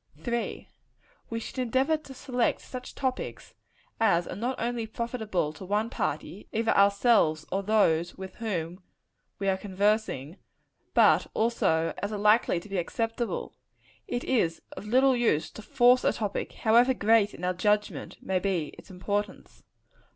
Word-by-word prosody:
3. 235 Hz, -1 st, -3 dB, 0.6 s
We 230 Hz, -, -3 dB
should 245 Hz, -, -7 dB
endeavor 260 Hz, +5 st, +2 dB
to 300 Hz, -3 st, -9 dB
select 250 Hz, -3 st, -1 dB
such 250 Hz, -1 st, -8 dB
topics 260 Hz, -1 st, -4 dB, 0.5 s
as 175 Hz, -6 st, +3 dB
are -, -, -5 dB
not 245 Hz, +5 st, -3 dB
only 235 Hz, -1 st, -2 dB
profitable 220 Hz, -9 st, -2 dB
to 155 Hz, -, -11 dB
one 210 Hz, +5 st, -1 dB
party -, -, -4 dB
either 225 Hz, +1 st, +1 dB
ourselves 200 Hz, -6 st, +4 dB
or 195 Hz, -, 0 dB
those 175 Hz, -5 st, +2 dB
with 190 Hz, 0 st, -8 dB
whom 180 Hz, -5 st, -3 dB, 0.6 s
we 195 Hz, -, -3 dB
are 190 Hz, -1 st, +2 dB
conversing 200 Hz, -6 st, -1 dB, 0.6 s
but -, -, +6 dB
such -, -, -14 dB
also 165 Hz, -8 st, +1 dB
as 205 Hz, -, -3 dB
are 210 Hz, -, -3 dB
likely 210 Hz, -3 st, +3 dB
to 175 Hz, -, -13 dB
be 195 Hz, -2 st, -2 dB
acceptable. 230 Hz, +6 st, -3 dB, 0.5 s
It 245 Hz, -, -2 dB
is 175 Hz, -11 st, 0 dB
of 210 Hz, -, -9 dB
little 260 Hz, +3 st, +4 dB
use 165 Hz, -10 st, +1 dB
to -, -, -10 dB
force 245 Hz, +4 st, +4 dB
a -, -, +3 dB
topic, 210 Hz, -3 st, -3 dB
however 240 Hz, +4 st, +4 dB
great, 215 Hz, -1 st, +3 dB
in -, -, -11 dB
our 180 Hz, 0 st, +1 dB
judgment, 210 Hz, +3 st, -1 dB
may 190 Hz, -1 st, 0 dB
be 180 Hz, -5 st, -1 dB
its -, -, -15 dB
importance. 200 Hz, +3 st, -4 dB
210 Hz, 155 wpm, -28 LUFS, 190-235 Hz, 0.6 s, but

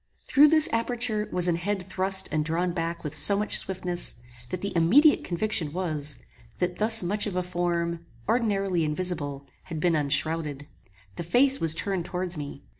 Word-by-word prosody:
Through 290 Hz, +2 st, +5 dB
this 310 Hz, 0 st, +5 dB
aperture 230 Hz, -2 st, -1 dB
was 180 Hz, -1 st, +3 dB
an 170 Hz, -1 st, +1 dB
head 190 Hz, +2 st, -3 dB
thrust 190 Hz, +1 st, +5 dB
and 155 Hz, -1 st, 0 dB
drawn 170 Hz, +3 st, -1 dB
back 170 Hz, 0 st, -4 dB
with 150 Hz, -, -5 dB
so 200 Hz, -, +4 dB
much 210 Hz, +1 st, 0 dB
swiftness, 180 Hz, -2 st, -3 dB, 0.3 s
that 185 Hz, -, -5 dB
the 200 Hz, -, -4 dB
immediate 255 Hz, -, +4 dB
conviction 175 Hz, -4 st, -2 dB
was, 155 Hz, -5 st, -1 dB, 0.4 s
that 180 Hz, 0 st, -2 dB
thus 225 Hz, -1 st, +2 dB
much 205 Hz, +4 st, -2 dB
of 195 Hz, -, -5 dB
a 180 Hz, -, -1 dB
form, 170 Hz, -1 st, -3 dB, 0.2 s
ordinarily 195 Hz, -7 st, 0 dB
invisible, 150 Hz, -3 st, -2 dB, 0.2 s
had 160 Hz, -, -6 dB
been 170 Hz, +1 st, +1 dB
unshrowded. 150 Hz, 0 st, -1 dB, 0.5 s
The -, -, -4 dB
face 265 Hz, +10 st, +3 dB
was 160 Hz, -1 st, +2 dB
turned 190 Hz, -1 st, -3 dB
towards 180 Hz, -1 st, -3 dB
me. 145 Hz, -2 st, -8 dB
180 Hz, 170 wpm, -25 LUFS, 165-205 Hz, 0.5 s, Through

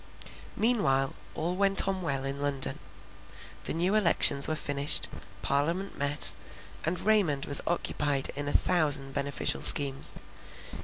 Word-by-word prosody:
Meanwhile 135 Hz, -, -1 dB, 0.2 s
all 170 Hz, +3 st, -5 dB
went 195 Hz, 0 st, +1 dB
on 190 Hz, -1 st, -4 dB
well 140 Hz, -5 st, -5 dB
in 140 Hz, +1 st, -5 dB
London. 140 Hz, -2 st, -4 dB, 0.9 s
The -, -, -5 dB
new 180 Hz, +4 st, -2 dB
elections 170 Hz, -8 st, +4 dB
were 155 Hz, -, -3 dB
finished; 145 Hz, -1 st, -2 dB, 0.4 s
parliament 165 Hz, -, -3 dB
met, 145 Hz, +1 st, 0 dB, 0.5 s
and 170 Hz, +2 st, -4 dB
Raymond 190 Hz, -10 st, -1 dB
was 145 Hz, -, +4 dB
occupied 145 Hz, -5 st, -3 dB
in 145 Hz, 0 st, -6 dB
a -, -, -3 dB
thousand 145 Hz, -7 st, +1 dB
beneficial 140 Hz, 0 st, -2 dB
schemes. 140 Hz, -1 st, +7 dB
145 Hz, 125 wpm, -26 LUFS, 140-180 Hz, 0.9 s, schemes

